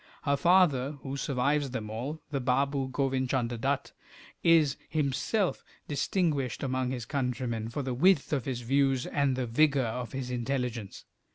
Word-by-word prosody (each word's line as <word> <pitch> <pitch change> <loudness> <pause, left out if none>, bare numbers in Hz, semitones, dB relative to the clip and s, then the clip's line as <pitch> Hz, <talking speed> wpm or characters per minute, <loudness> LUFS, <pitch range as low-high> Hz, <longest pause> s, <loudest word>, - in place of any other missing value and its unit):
Her 140 -1 +2
father, 150 -5 +3
who 135 0 -4
survives 140 +1 0
them 110 -4 -5
all, 140 +8 -5
the 140 - 0
Baboo 135 +1 +1
Govin 130 -1 0
Chunder 120 -3 0
Dutt, 135 +2 -1 0.5
is 160 -5 +4
himself 155 - 0 0.2
distinguished 145 - 0
among 130 -1 -1
his 125 -3 -4
countrymen 125 -4 -2
for 140 +5 -3
the 130 -1 -2
width 160 +3 +3
of 135 -5 0
his 125 -3 -3
views 135 +1 +2
and 140 -2 +1
the 130 -1 -1
vigour 140 +2 +3
of 120 +2 -4
his 130 -2 -4
intelligence. 125 -4 -3
135 Hz, 155 wpm, -29 LUFS, 125-145 Hz, 0.5 s, is